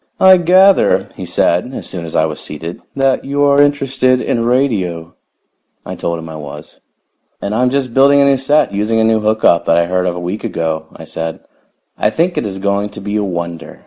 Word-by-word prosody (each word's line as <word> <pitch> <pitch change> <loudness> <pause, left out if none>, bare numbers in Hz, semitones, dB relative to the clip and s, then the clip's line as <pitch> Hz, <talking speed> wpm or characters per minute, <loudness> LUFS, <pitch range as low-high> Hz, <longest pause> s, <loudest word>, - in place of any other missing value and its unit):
"I 190 0 +7
gather," 185 +3 +3
he - - -7
said 90 +10 0
as - - -7
soon 85 -3 -6
as 80 - -8
I 80 - +3
was 80 -1 -5
seated, 80 +3 -7
"that 135 -1 +1
you 140 +1 -1
are 140 0 +4
interested 135 -3 +1
in 115 -2 -1
radio." 100 -11 -1 0.7
I - - -6
told 85 0 -3
him 80 0 -8
I 80 -1 -8
was. 75 0 -11 0.6
"And 100 - -4
I'm 125 +3 +2
just 130 -2 -2
building 140 +2 +5
a 140 - +4
new 140 -1 +3
set, 140 -2 +1
using 105 +3 0
a - - +3
new 110 0 +2
hook 110 +1 -1
up 85 0 +4
that 85 - +3
I 85 - +3
heard 90 +1 -1
of 90 - -2
a - - -5
week 90 +4 -5
ago," 80 -1 -3
I - - -11
said. 80 0 -6 0.6
"I - - +2
think 170 +9 0
it 110 - -2
is 95 -1 -6
going 100 +1 -1
to 105 - -10
be 105 +1 -4
a 105 - 0
wonder. 85 -3 -5
105 Hz, 220 wpm, -15 LUFS, 85-135 Hz, 0.7 s, I